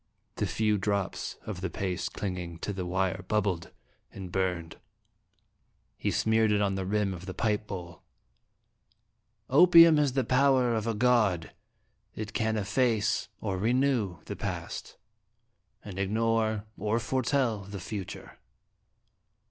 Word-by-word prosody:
The - - 0
few 105 -2 +1
drops 100 -1 -2
of 100 -4 -5
the 95 - -2
paste 95 +1 -3
clinging 90 -4 -4
to 105 - -3
the 90 -2 -4
wire 95 +1 -1
bubbled 95 -5 0 0.4
and 95 -2 -8
burned. 90 -4 -2 1.2
He - - -2
smeared 110 0 +2
it 105 - +3
on 100 -1 +1
the 95 -1 -3
rim 105 -1 0
of 90 +1 -9
the 95 - -5
pipe 105 -1 0
bowl. 85 -4 -7 0.8
" - - -50 0.7
Opium 165 +1 +8
has 145 -3 +2
the 135 -1 +1
power 130 -2 +3
of 110 0 -1
a 115 - 0
god; 105 -8 +2 0.6
it 110 0 -5
can 110 -1 0
efface 110 +1 +1
or 95 -4 -2
renew 120 -4 +1
the - - -5
Past, - - -5 0.9
and 95 -2 -7
ignore 110 +1 +1
or 110 +1 0
foretell 125 -1 0
the 100 0 -7
Future." 95 +1 -7
105 Hz, 135 wpm, -29 LUFS, 95-115 Hz, 1.2 s, Opium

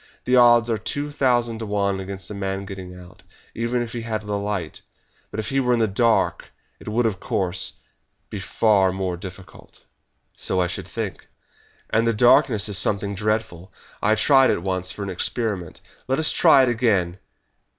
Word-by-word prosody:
The 125 - +2
odds 120 -1 +6
are 115 -2 -1
two 145 +6 -3
thousand 120 -5 +1
to 110 - -5
one 100 -1 0
against 95 +1 -7
a - - -4
man 95 0 -4
getting 95 -2 -9
out, 90 +1 -15 0.3
even 120 +1 -1
if 115 - -8
he 120 - -4
had 110 -1 -4
a 105 0 -4
light; 100 -4 -3 0.5
but - - -6
if 105 -1 -3
he 135 - +1
were 125 -2 +2
in - - +2
the 110 - +2
dark 115 +3 +1 0.3
it - - -15
would, 115 +3 0
of 105 -5 -1
course, 95 -1 0 0.6
be 105 - -5
far 95 0 +2
more 95 -1 -3
difficult." 90 -1 -12 0.5
"So 95 - -2
I 90 - +2
should 90 - -5
think." - - -6 0.6
"And 115 +1 +2
the 115 - +2
darkness 115 -1 +4
is 100 -2 +1
something 100 0 0
dreadful. 105 -3 -3 0.3
I 110 - +3
tried 135 +4 +5
it 85 - 0
once 95 -1 -2
for 100 - -6
an 100 - -4
experiment. 95 -2 -3 0.3
Let 135 +1 0
us 160 0 +3
try 135 - +5
it 130 - +2
again!" 100 -7 0
105 Hz, 185 wpm, -22 LUFS, 95-115 Hz, 0.6 s, odds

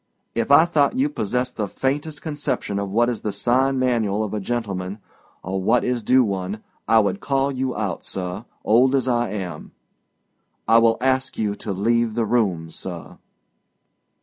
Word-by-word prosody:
If 115 +1 -1
I 145 +4 +7
thought 160 - +2
you 275 +3 +2
possessed 125 - -2
the 105 -2 -1
faintest 145 +7 -2
conception 145 -9 -2
of 100 -1 -3
what 115 +4 +2
is 120 -2 -2
the 105 - -2
sign 130 +6 +1
manual 115 -5 +1
of 105 - -4
a 105 - -1
gentleman, 100 -3 -3 0.5
or 95 +1 -2
what 115 +6 +3
is 125 -1 0
due 125 +4 +4
one, 100 0 -3 0.2
I 115 - +5
would 110 - 0
call 135 -3 0
you 130 -1 -2
out, 105 -3 -3
sir, 95 +4 -5 0.2
old 125 +5 +4
as 130 -1 +1
I 120 -2 +1
am. 95 -3 -6 0.9
I 115 +1 +6
will 115 -1 +4
ask 130 0 0
you 105 -2 0
to 105 0 -6
leave 115 +3 +1
the 115 -1 +1
room, 95 -8 0
sir." - - -8
115 Hz, 175 wpm, -22 LUFS, 100-130 Hz, 0.9 s, I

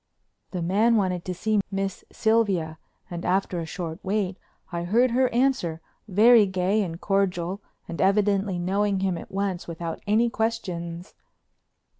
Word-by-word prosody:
The 180 -3 -3
man 210 +7 +3
wanted 185 -4 0
to 185 - -2
see 215 +2 +1
Miss 195 -1 -3
Sylvia 195 -8 +1 0.3
and, 175 0 -5
after 185 -1 0
a 165 - -4
short 165 -2 -5
wait, 195 -1 -1 0.3
I 170 -1 -2
heard 235 +8 +3
her 255 +1 +3
answer, 240 -10 +1 0.3
very 215 +2 +6
gay 190 +3 +1
and 170 -4 -4
cordial 195 -1 0 0.3
and 170 - -4
evidently 195 -1 +2
knowing 195 +2 0
him 190 -2 +1
at 165 - -8
once 195 -2 -2
without 170 0 -5
any 220 +3 +3
questions. 180 -7 -3
195 Hz, 145 wpm, -25 LUFS, 175-210 Hz, 0.3 s, very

